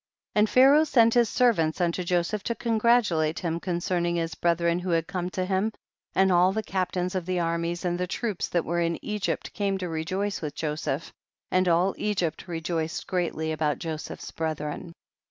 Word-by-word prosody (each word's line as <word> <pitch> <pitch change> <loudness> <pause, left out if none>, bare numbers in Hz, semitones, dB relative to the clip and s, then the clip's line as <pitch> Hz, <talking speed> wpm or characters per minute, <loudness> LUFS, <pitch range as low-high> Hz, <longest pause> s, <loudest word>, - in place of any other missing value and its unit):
74. - - +4
And 210 0 +4
Pharaoh 275 +4 +6
sent 235 -7 +4
his 240 -3 +4
servants 195 -11 +2
unto 175 +1 0
Joseph 180 +4 0
to 235 - -1
congratulate 220 -9 +2
him 170 -1 -2
concerning 175 -1 -1
his 165 -1 -1
brethren 170 0 +1
who 180 +1 -4
had 165 -1 +2
come 180 0 -3
to 185 0 -2
him, 195 +3 0 0.4
and 190 0 +4
all 180 +1 +5
the 220 +2 -2
captains 185 -2 -1
of 185 -2 -3
the 185 -1 0
armies 170 +1 -1
and 175 0 0
troops 215 -3 -2
that 175 -2 0
were 170 +1 0
in 170 0 0
Egypt 210 -1 -2
came 200 -2 0
to 185 -1 -4
rejoice 185 +5 -2
with 150 -2 -4
Joseph, 150 -1 -3 0.4
and 185 0 +3
all 175 +3 +3
Egypt 185 -6 -1
rejoiced 165 -1 -3
greatly 170 -3 -1
about 155 -1 0
Joseph's 160 -2 -6
brethren. 160 +1 -4
175 Hz, 175 wpm, -26 LUFS, 165-195 Hz, 0.4 s, Pharaoh